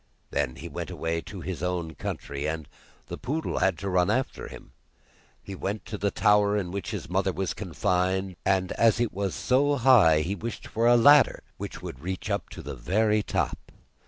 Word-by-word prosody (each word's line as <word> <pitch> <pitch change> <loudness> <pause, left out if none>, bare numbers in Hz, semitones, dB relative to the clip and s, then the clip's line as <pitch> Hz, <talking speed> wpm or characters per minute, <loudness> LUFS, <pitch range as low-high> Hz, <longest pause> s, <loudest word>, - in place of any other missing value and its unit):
Then 70 -3 -1
he 80 +5 -8
went 85 0 -5
away 85 -1 -2
to 95 0 -9
his 90 0 -5
own 90 -2 -2
country, 70 0 -4
and 80 -2 -3 0.4
the - - -7
poodle 155 +4 -2
had 95 -2 +2
to 100 - -5
run 90 -2 +2
after 130 0 -1
him. - - -12 0.7
He 100 - -8
went 100 +3 -4
to 105 - -5
the 100 - +1
tower 105 0 +3
in 90 -4 -2
which 100 0 -4
his - - -5
mother - - +1
was - - -2
confined, 95 +1 -1
and 95 -2 +1
as 115 0 +3
it 120 -2 0
was 100 0 -2
so 140 +3 +2
high, 115 - +6
he 85 +6 -2
wished 115 +3 -6
for 115 +1 0
a 120 - +7
ladder 145 +4 +6
which - - -7
would 65 - -7
reach 95 +6 -4
up 100 -6 -2
to - - -9
the - - -6
very 105 +2 +1
top. - - -3
95 Hz, 195 wpm, -27 LUFS, 85-110 Hz, 0.7 s, a